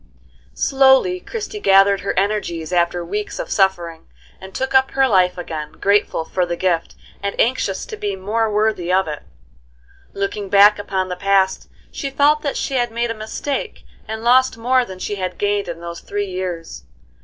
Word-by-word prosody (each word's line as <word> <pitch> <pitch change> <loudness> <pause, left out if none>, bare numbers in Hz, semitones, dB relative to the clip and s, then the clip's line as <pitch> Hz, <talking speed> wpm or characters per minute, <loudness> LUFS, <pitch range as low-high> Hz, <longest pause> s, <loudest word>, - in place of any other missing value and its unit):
Slowly 270 +7 +3
Christie 425 +1 -6
gathered 195 - +5
her 200 - -3
energies 185 -5 -1
after 175 0 +1
weeks 205 +4 -4
of - - -5
suffering, 175 -4 0 0.3
and 190 0 -10
took 265 +7 -3
up 265 0 +4
her 270 -1 +2
life 185 -5 +3
again, 160 -3 -6
grateful 200 -5 +1
for 185 - -1
the 175 -1 -2
gift, 170 -2 -1 0.3
and 200 0 -4
anxious 250 +3 0
to 455 - -7
be 205 - -3
more 215 +4 -1
worthy 210 -4 0
of 190 -1 +2
it. 150 -1 -5 0.9
Looking 200 0 -3
back 205 +1 +6
upon 190 -2 -2
the 180 - -3
past 195 0 +1 0.2
she 275 - -4
felt 290 +2 +3
that 285 -2 -2
she - - -3
had 240 -1 +1
made 235 +1 -1
a - - -1
mistake 270 - -5 0.2
and 220 +1 -5
lost 255 +1 +4
more 250 +2 +2
than 190 -4 -9
she 205 +2 -4
had 185 -1 -4
gained 205 0 0
in 170 -1 -6
those 170 0 -7
three 205 0 -3
years. 175 - -5
200 Hz, 180 wpm, -20 LUFS, 180-240 Hz, 0.9 s, back